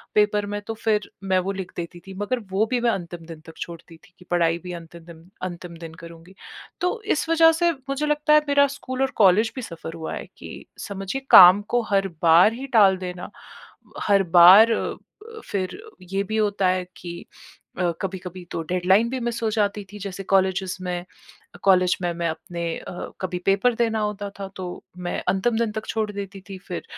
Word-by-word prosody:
Paper 210 0 +3
में 205 - -3
तो 225 - -3
फिर 210 -2 +1
मैं 190 -1 +2
वो 185 +2 -2
लिख 190 -2 -6
देती 175 0 -6
थी। 195 - -8
मगर 245 +5 -1
वो 200 +3 +2
भी 250 - +2
मैं 235 -1 +3
अंतिम 175 -3 -6
दिन 165 -2 -9
तक 160 - -12
छोड़ती 170 -1 -9
थी 180 - -24
कि 180 - -16
पढ़ाई 170 -1 +2
भी 180 -1 -6
अंतिम 165 0 -14
दिन 170 +1 -14
अंतिम 175 -2 -6
दिन 165 -1 -9
करूँगी। 170 +3 -13 0.5
तो 360 +6 -1
इस 310 - -2
वज़ह 325 0 +6
से 340 +1 +2 0.2
मुझे 275 +2 -1
लगता 300 0 +2
हैं 300 - +7
मेरा 285 0 +4
स्कूल 260 0 -5
और 270 - +1
कॉलेज 215 +2 +4
भी 255 - -4
सफ़र 165 -5 -8
हुआ 160 -1 -5
हैं - - -7
कि - - -10 0.2
समझिए 195 +6 -4
काम 185 +3 +10
को 240 - +3
हर 195 0 +3 0.2
बार 170 +6 +6
ही 265 +3 -7
टाल 195 -3 +6
देना। 180 -1 -6 0.7
हर 200 -2 +3
बार 195 +7 +9
अ - - -1 0.4
अ, - - -9
फिर 190 -2 -1 0.3
ये 195 +2 -3
भी 220 +2 -3
होता 205 -3 +1
हैं 185 0 0
कि 175 - -8 0.7
अ, 175 -1 +1
कभी-कभी 185 -1 -6
तो 165 - -3
डेडलाइन 190 +5 +3
भी 260 +1 -3
मिस 235 0 -3
हो 220 - +2
जाती 205 -1 0
थी। 205 - -9
जैसे 195 0 -6
कॉलेजेस 190 -1 +1
में 180 -1 -4 0.6
कॉलेज 185 -2 +4
में 175 -1 0
मैं 170 0 -2
अपने 170 +1 -6 0.2
अ, 175 - -8
कभी 185 -1 -3
पेपर 200 +5 +3
देना 225 -1 0
होता 210 -1 -3
था 195 - -4
तो 185 - -5 0.4
मैं - - -2
अंतिम 210 +5 +1
दिन 230 -2 0
तक 215 0 -5
छोड़ 220 -1 -1
देती 200 -1 -7
थी 195 - -7
फिर 180 - -5
195 Hz, 200 wpm, -23 LUFS, 180-220 Hz, 0.7 s, काम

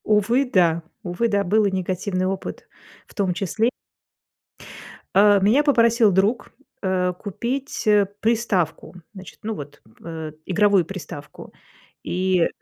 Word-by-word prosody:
Увы, 220 +6 +2
да 170 -3 +3 0.2
увы, 185 +5 -1
да, 200 -1 +1
был 210 +3 +2
и 200 - +1
негативный 185 0 -2
опыт 190 0 -5 0.4
в - - -18
том 190 -3 0
числе. 210 +6 0 1.5
Э, 205 +1 +6
меня 225 +9 +4
попросил 235 -6 +4
друг, 195 +6 +1 0.3
э, 185 -2 0
купить, 235 +7 -4
э, 210 -1 +5 0.2
приставку, 220 -7 0 0.2
значит, 190 -3 -12
ну, 220 +1 -2
вот, 145 -3 -10 0.2
э, 160 -2 -6
игровую 195 -1 +3
приставку, 150 -5 -9 0.5
и 185 -1 +1
195 Hz, 125 wpm, -22 LUFS, 180-220 Hz, 1.5 s, Э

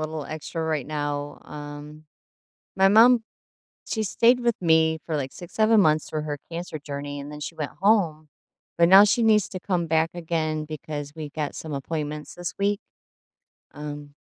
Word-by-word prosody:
little 155 -1 -4
extra 160 +2 -5
right 155 -4 -1
now. 145 -1 -3
Um, 150 +1 -9 0.7
my 195 0 +5
mom, 230 +3 +6 0.7
she 220 - -1
stayed 235 +4 +3
with 235 -2 0
me 160 -2 +3
for, 160 - -1
like, 135 -2 -3
6, 175 - -11
7 220 0 +4
months 155 -3 +2
for 155 -1 -2
her 145 -1 -4
cancer 170 -2 -5
journey, 145 0 -6
and 145 +1 -8
then 150 - -8
she 155 +3 -5
went 150 -3 -4
home, 170 -7 +2 0.5
but 170 0 +5
now 195 +2 +9
she 210 +3 +2
needs 215 -3 +4
to 185 - -6
come 175 -3 -1
back 160 0 +2
again 160 -2 -2
because 150 -1 -6
we 155 -2 -6
got 150 -1 -4
some 160 - -7
appointments 150 +1 -4
this 175 0 -5
week. 200 0 +1 0.9
Um, 145 -1 -7
155 Hz, 175 wpm, -25 LUFS, 150-180 Hz, 0.9 s, now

